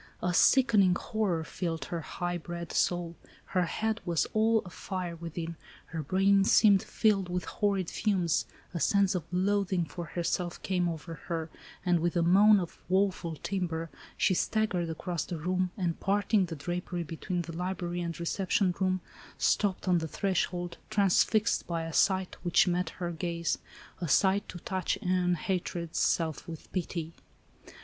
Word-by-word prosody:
A 180 0 +1
sickening 205 -5 +5
horror 195 -6 -1
filled 165 -1 -3
her 170 -1 -4
high 175 +2 -3
bred 170 0 -6
soul, 175 -1 0 0.4
her 180 -1 +3
head 220 +5 -1
was 170 -3 +1
all 220 0 +3
afire 180 0 -5
within, 165 0 -6 0.4
her 160 - -2
brain 195 +5 +3
seemed 200 -1 +6
filled 200 -5 +1
with 180 0 -2
horrid 200 -4 0
fumes, 185 -6 0 0.3
a 170 - -2
sense 200 +2 +3
of 175 -5 -2
loathing 190 -1 +1
for 170 +3 -6
herself 175 +1 -2
came 180 -2 +1
over 165 -1 -6
her, 165 -2 -3 0.3
and, 175 -1 +3
with 170 +2 0
a 170 - +3
moan 200 +4 +6
of 175 -3 -6
woeful 185 -3 +1
timbre, 165 -4 -2 0.3
she - - +3
staggered 185 -3 0
across 165 0 -3
the 175 - -5
room, 180 +3 0
and 175 -4 -1
parting 200 0 +2
the 165 - -5
drapery 175 +3 -3
between 170 +3 -3
the 165 -1 -8
library 175 0 -3
and 170 -1 -4
reception 185 +2 +1
room, 185 -1 +1 0.4
stopped 200 -2 +1
on 180 -2 +4
the 160 - -3
threshold, 175 0 -1
transfixed 210 +2 +2
by 170 -1 -2
a 165 0 -5
sight 190 +1 +2
which 175 +1 +4
met 180 +1 0
her 175 -1 -3
gaze, 170 0 -2 0.4
"a 175 - -2
sight 190 +7 +3
to - - -7
touch 185 +1 -2
e'en 180 -1 +2
hatred's 175 -1 -2
self 160 -3 0
with 165 -2 -9
pity." 170 -3 -3
180 Hz, 155 wpm, -30 LUFS, 170-190 Hz, 0.4 s, seemed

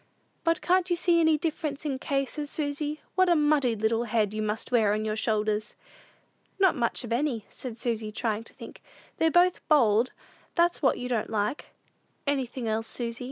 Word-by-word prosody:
'" - - -42
"But 330 -1 +1
can't 365 0 +2
you 350 - +2
see 345 -1 +3
any 320 -2 +4
difference 305 -2 -3
in 295 - 0
the 260 - -5
cases, 280 +2 -2
Susy? 295 0 -3
What 370 0 +3
a 345 - +5
muddy 295 -6 +3
little 225 +2 0
head 215 -2 0
you 215 - -2
must 215 +3 -3
wear 220 -4 +3
on 215 +1 -1
your 215 0 -1
shoulders!" 215 -1 -1 0.8
"Not 380 -2 +4
much 240 -1 -1
of 235 -1 -3
any," 240 -4 -1
said 240 -4 -7
Susy, 225 -3 -2
trying 220 0 -2
to - - -13
think; - - -11 0.4
"they're 325 - +3
both 355 +2 +3
bold; 240 -5 +4 0.4
that's 345 0 +2
what 270 - +3
you 250 - -4
don't 235 -4 -1
like." 215 +5 -1 0.6
"Anything 260 -4 -2
else, 220 +1 -1
Susy?" 235 +1 -3
250 Hz, 190 wpm, -27 LUFS, 220-305 Hz, 0.8 s, a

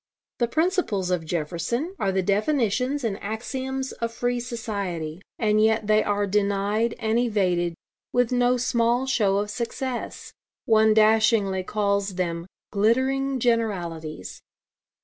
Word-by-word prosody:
The 240 - +2
principles 310 - 0
of 165 -3 -1
Jefferson 175 - -2
are 195 - +1
the 190 0 0
definitions 250 - +1
and 210 -4 -2
axioms 260 +5 -4
of 230 0 -4
free 245 +1 -1
society. 200 -9 -4 0.2
And 215 -1 +2
yet 220 0 +2
they 215 0 +3
are 205 0 0
denied 205 +3 0
and 225 0 +1
evaded, 180 -7 +1 0.4
with 245 -1 +2
no 245 0 +3
small 240 0 +1
show 210 -7 +2
of 205 +1 -1
success. 240 +3 -4 0.3
One 220 -1 +4
dashingly 215 -3 +4
calls 200 0 -1
them 170 -1 -2 0.2
'glittering 260 +6 +1
generalities.' 175 - -2
215 Hz, 125 wpm, -25 LUFS, 195-245 Hz, 0.4 s, One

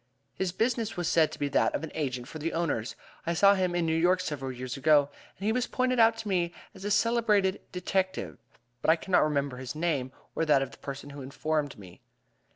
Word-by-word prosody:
"His 190 -2 -2
business 225 +1 -1
was 175 -2 -1
said 160 -2 +3
to - - -8
be 145 - -1
that 140 - +2
of 145 - -3
an 160 - -5
agent 130 -5 -3
for 155 - -8
the 165 +2 -2
owners. 155 -9 -1 0.3
I 170 - +1
saw 200 +4 +6
him 185 -2 0
in 175 -1 +1
New 160 0 +1
York 180 +3 +3
several 145 -7 -3
years 130 0 -5
ago, 145 0 +4 0.3
and 195 - -6
he 215 - +3
was 245 +1 0
pointed 255 -1 0
out 225 0 +5
to 225 -1 -6
me 175 -3 0 0.2
as 190 - -12
a 205 - -2
celebrated 210 -3 +2
detective, 185 +1 -2 0.4
but - - 0
I 160 - +7
cannot 180 +2 +2
remember 140 -3 0
his 130 +3 -6
name, 150 -6 -1 0.2
or - - 0
that 150 -4 +4
of 135 - -6
the - - -15
person 140 +1 -7
who 140 0 -8
informed 145 +2 -2
me. 90 -4 -13
165 Hz, 225 wpm, -29 LUFS, 140-190 Hz, 0.4 s, I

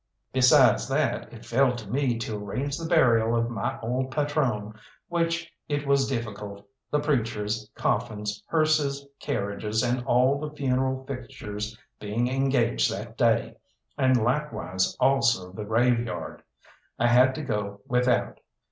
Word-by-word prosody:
Besides 125 -1 +5
that, - - -1
it - - -12
fell 125 +1 +2
to 115 -4 -8
me 125 +1 0
to 115 -1 -4
arrange 125 +8 -3
the 165 +1 -5
burial 120 -8 +4
of 115 0 0
my 110 - -3
old 125 +3 -1
patrone, 135 -7 -1 0.4
which 165 -1 -1 0.2
it 145 0 -1
was 140 -1 +3
difficult, 105 -5 -5 0.2
the 150 - +1
preachers, 110 -7 -1
coffins, 105 -1 -2
hearses, 155 -3 +1
carriages, 105 +3 -2
and 125 0 0
all 130 +2 +3
the 150 0 -4
funeral 130 -1 0
fixtures 110 -5 -6 0.2
being 110 +4 -1
engaged 130 -2 +1
that 110 +3 -6
day, 115 0 +1 0.4
and 130 -2 +3
likewise 115 -8 -1
also 120 -8 +2
the 105 +3 -6
graveyard. 120 +1 0 0.6
I 120 - +1
had 125 +2 +5
to 155 - -4
go 100 -6 -3
without. 125 0 +1
120 Hz, 135 wpm, -26 LUFS, 110-135 Hz, 0.6 s, Besides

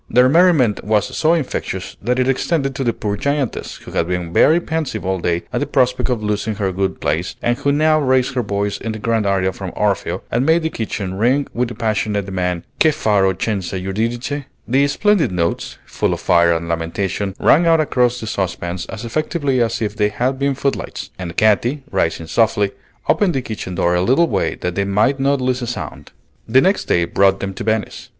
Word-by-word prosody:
Their 125 +1 +5
merriment 155 - +4
was 105 -1 0
so 165 +2 +3
infectious 125 - -4
that 125 +4 0
it 130 0 +2
extended 135 +1 0
to 135 0 -3
the 120 - +2
poor 105 -2 -3
giantess, 140 +3 -2
who - - -12
had 85 - 0
been 90 -2 -3
very 160 - +5
pensive 160 - -3
all 95 0 0
day 85 0 -1
at - - 0
the 145 - -2
prospect 125 -1 +1
of 120 -4 -1
losing 105 +1 -1
her 100 -2 -1
good 95 0 -2
place, 80 +6 -1
and 120 - +1
who 140 - +1
now 155 +2 +3
raised 130 -2 +2
her 125 - 0
voice 100 -2 -2
in 115 - -4
the - - -5
grand 110 -1 0
aria 95 -1 +1
from - - -6
"Orfeo," - - -1
and 120 +2 +1
made 160 +3 +3
the 160 - -1
kitchen 100 -4 -4
ring 130 +5 +2
with 125 +1 0
the 120 - -8
passionate 105 -2 -1
demand 90 -3 -2 0.2
"Che 160 - +5
farò 105 -10 +2
senza 100 -4 -2
Eurydice?" 115 +9 -2 0.2
The 135 +4 +3
splendid 200 - +2
notes, 85 -2 -2
full - - -1
of - - -9
fire 85 -1 +4
and 85 0 -3
lamentation, 95 +4 -2
rang 170 +4 +4
out 165 -1 +5
across 125 -5 +1
the 110 - -6
saucepans 90 -3 -3
as 115 +1 -7
effectively 145 0 0
as 115 0 0
if 105 0 -3
they 105 -1 +2
had 125 +5 -1
been 140 0 +1
footlights; 140 0 -3
and 90 -2 -6
Katy, 120 +6 +2
rising 80 0 0
softly, 105 +3 +1 0.4
opened 190 -6 +2
the 135 - 0
kitchen 100 -5 -5
door 85 0 +1
a 90 - +2
little 135 - +3
way - - -1
that 90 - -2
they 100 - 0
might 105 +8 +1
not 140 +1 +2
lose 125 0 0
a 120 - -3
sound. 120 - -6 0.4
The 130 +4 +6
next 190 +8 +2
day 85 -1 +2
brought 95 +2 +2
them 95 0 -4
to - - -6
Venice. 110 0 -2
110 Hz, 210 wpm, -19 LUFS, 95-135 Hz, 0.4 s, The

